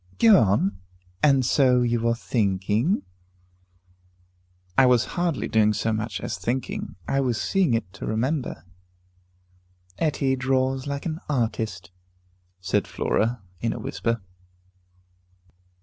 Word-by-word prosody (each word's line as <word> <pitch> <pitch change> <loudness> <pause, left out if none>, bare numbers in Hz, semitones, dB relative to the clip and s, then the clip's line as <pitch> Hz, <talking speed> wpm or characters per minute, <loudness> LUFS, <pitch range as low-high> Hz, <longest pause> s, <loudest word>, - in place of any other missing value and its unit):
"Go 220 -4 +7
on. 100 -2 +1 0.4
And 135 -4 +4
so 125 -1 +4
you 120 -1 +1
were 115 +1 +1
thinking 110 - 0 0.8
" 90 0 -37
"I 130 - +7
was 125 -2 +4
hardly 175 -5 -1
doing 110 -1 +3
so 110 +1 -1
much 110 0 -3
as - - -4
thinking. 120 +7 -3
I 135 - +1
was 125 -4 0
seeing 185 -11 +2
it 100 -5 -4
to 100 - -7
remember." 120 - -2 1.3
"Etty 140 -4 +1
draws 130 +1 0
like 140 0 -4
an 160 -1 -3
artist," 110 - -2 0.7
said 95 +3 0
Flora, 115 -1 -1 0.2
in 115 +2 -1
a - - -6
whisper. 115 -3 -2
115 Hz, 120 wpm, -25 LUFS, 100-130 Hz, 1.3 s, Go